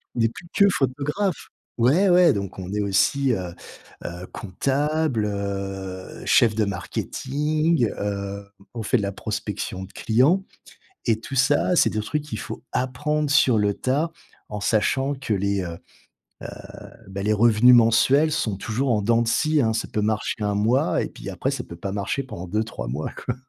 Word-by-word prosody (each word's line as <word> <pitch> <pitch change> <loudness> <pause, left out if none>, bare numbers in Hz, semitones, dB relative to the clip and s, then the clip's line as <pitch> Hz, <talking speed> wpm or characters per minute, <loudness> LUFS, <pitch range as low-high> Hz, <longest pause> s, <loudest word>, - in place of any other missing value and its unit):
on - - -3
n'est 115 - +3
plus 170 - -12
que 200 - +5
photographe. 150 - -1 0.3
Ouais, 155 +12 +4
ouais, 175 -1 +6
donc 100 -2 -4
on 95 0 -6
est 105 - 0
aussi, 120 +7 +2
heu 90 -4 -4 0.5
heu, 90 +1 -6
comptable, 140 - 0
heu, 95 -2 -5
chef 110 -3 +4
de 110 -2 +2
marketing. 150 - -1
Heu, 100 0 -4 0.3
on 115 - -4
fait 125 - +2
de 105 - -2
la 100 - -1
prospection 105 -2 -4
de 95 - -10
clients 140 - +2 0.6
et 110 -2 +2
tout 135 - -7
ça, 140 +7 +3
c'est - - +4
des 110 - -2
trucs 150 +7 -2
qu'il 150 - -6
faut - - -7
apprendre 150 +4 -1
sur 135 -4 +4
le 100 -1 +1
tas, 150 +6 0 0.4
en 105 -1 -4
sachant 130 +7 +1
que 135 -5 -3
les, 100 0 0
heu 90 - -4 1.2
heu, - - -17 0.2
bah, 95 0 -5
les 105 +2 +2
revenus 115 +3 +6
mensuels 130 +7 +4
sont 110 -9 -1
toujours 120 +6 -2
en 110 - +2
dents 115 +2 +3
de 115 - -2
scie, 155 +5 +2
hein. 110 -4 +2
Ça 110 - -2
peut 105 - -2
marcher 110 0 -1
1 105 0 0
mois 110 +6 +2
et - - -3
puis, - - -8
après - - -2
ça - - -4
peut 85 - -10
pas 95 +3 -5
marcher 105 +7 -2
pendant 95 -9 -8
2-3 105 - -3
mois, 70 +6 -3
quoi. - - -1
115 Hz, 180 wpm, -24 LUFS, 100-140 Hz, 1.2 s, ouais